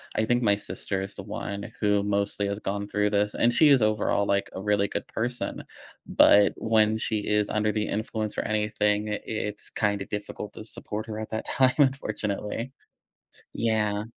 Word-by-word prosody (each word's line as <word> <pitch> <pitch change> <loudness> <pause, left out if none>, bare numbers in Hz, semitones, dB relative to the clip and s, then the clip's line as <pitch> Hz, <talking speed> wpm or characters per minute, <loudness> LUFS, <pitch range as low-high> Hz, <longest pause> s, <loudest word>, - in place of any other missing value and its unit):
I 110 - +2
think 120 +2 +2
my 105 -3 +4
sister 100 -1 -3
is 95 +1 -6
the 100 - -7
one 100 0 -5
who 105 -1 +3
mostly 100 0 -1
has 100 0 -2
gone 100 0 -3
through 105 0 +1
this, 105 0 +1
and 120 - +3
she 135 +6 +5
is 135 -5 +6
overall, 105 -1 +1
like, 100 0 0
a 95 - -5
really 100 -1 +2
good - - -4
person, 120 +2 -3 0.4
but 100 0 +6
when 110 -1 +2
she 110 -1 -1
is 105 -1 +2
under 105 0 0
the 105 -1 0
influence 110 0 -3
or - - 0
anything, 105 0 0
i 105 - -2
it's 105 -1 -3
kinda 100 -2 -1
difficult 105 0 -6
to 110 - -9
support 110 0 -3
her 110 0 -5
at 110 - -5
that 110 - -3
time, 130 -1 +3
unfortunately. 115 -3 -1 0.8
Yeah. 105 -2 0
105 Hz, 180 wpm, -26 LUFS, 100-110 Hz, 0.8 s, is